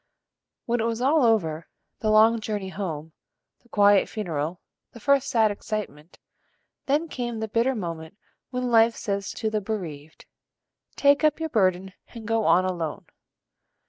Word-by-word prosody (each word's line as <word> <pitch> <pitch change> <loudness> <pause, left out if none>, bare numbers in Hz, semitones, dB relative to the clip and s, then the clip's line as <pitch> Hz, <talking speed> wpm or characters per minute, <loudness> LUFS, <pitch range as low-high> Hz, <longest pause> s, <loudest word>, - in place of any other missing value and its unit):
When 240 0 0
it 225 - 0
was 230 0 -1
all 280 +4 +3
over, 165 -9 +1 0.3
the 215 - -1
long 220 +2 +5
journey 210 -3 -4
home, 165 -5 -5 0.5
the 240 - -27
quiet 205 -2 +4
funeral, 170 -5 -3 0.3
the 235 - -11
first 280 +3 +2
sad 225 -4 +3
excitement, 195 -7 -6 0.7
then 295 +4 +1
came 240 -6 -4
the 220 - -3
bitter 230 +5 +1
moment 165 -3 -6 0.3
when 250 -1 -2
life 230 0 +5
says 200 -1 -3
to 220 -2 -3
the 215 -1 -1
bereaved: 165 -8 -6 0.7
"Take 285 +1 +3
up 305 0 +3
your 320 0 -3
burden 190 - +1 0.2
and 225 -1 -8
go 225 -1 +1
on 185 +1 +4
alone." 170 -4 -4
215 Hz, 150 wpm, -25 LUFS, 185-235 Hz, 0.7 s, long